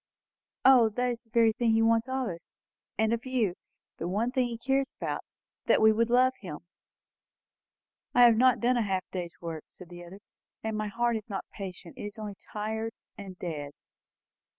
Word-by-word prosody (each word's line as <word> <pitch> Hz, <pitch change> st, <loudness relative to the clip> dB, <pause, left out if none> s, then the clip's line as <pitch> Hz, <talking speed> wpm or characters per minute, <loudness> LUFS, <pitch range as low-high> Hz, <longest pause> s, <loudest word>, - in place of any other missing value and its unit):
O, 255 Hz, -4 st, +8 dB
it 220 Hz, -, -8 dB
is 245 Hz, -1 st, -1 dB
the -, -, -32 dB
very 225 Hz, -1 st, +4 dB
thing 230 Hz, -1 st, +2 dB
he 225 Hz, 0 st, +4 dB
wants 225 Hz, +1 st, +3 dB
of 260 Hz, -1 st, -1 dB
us, 170 Hz, -3 st, -7 dB, 0.5 s
and 220 Hz, +1 st, +2 dB
of 235 Hz, 0 st, -2 dB
you; 245 Hz, -8 st, 0 dB, 0.5 s
the 170 Hz, -, -2 dB
one 215 Hz, +7 st, 0 dB
thing 255 Hz, -2 st, +1 dB
he 235 Hz, -1 st, -5 dB
cares 270 Hz, +3 st, 0 dB
about! -, -, -3 dB, 0.4 s
That -, -, +5 dB
we 220 Hz, 0 st, +7 dB
would 230 Hz, +2 st, +1 dB
love 255 Hz, +2 st, +4 dB
him." 175 Hz, -7 st, -7 dB, 1.5 s
"I 245 Hz, -, +7 dB
have 235 Hz, -2 st, +8 dB
not 255 Hz, +2 st, +4 dB
done 245 Hz, +1 st, +2 dB
a -, -, +2 dB
half 195 Hz, -3 st, 0 dB
day's 175 Hz, -2 st, -5 dB
work," 165 Hz, -2 st, -6 dB
said 180 Hz, -2 st, -13 dB
the 175 Hz, 0 st, -10 dB
other; 180 Hz, +3 st, -11 dB, 0.4 s
"and 220 Hz, -1 st, -2 dB
my 215 Hz, 0 st, -2 dB
heart 235 Hz, +2 st, 0 dB
is 215 Hz, +1 st, -10 dB
not 195 Hz, -, -4 dB
patient. 185 Hz, -4 st, -8 dB
It -, -, -5 dB
is 205 Hz, +2 st, -7 dB
only 210 Hz, -2 st, -5 dB, 0.2 s
tired, 220 Hz, +1 st, -3 dB, 0.2 s
and 195 Hz, -3 st, -9 dB
dead." 150 Hz, -5 st, -5 dB
220 Hz, 195 wpm, -29 LUFS, 195-240 Hz, 1.5 s, O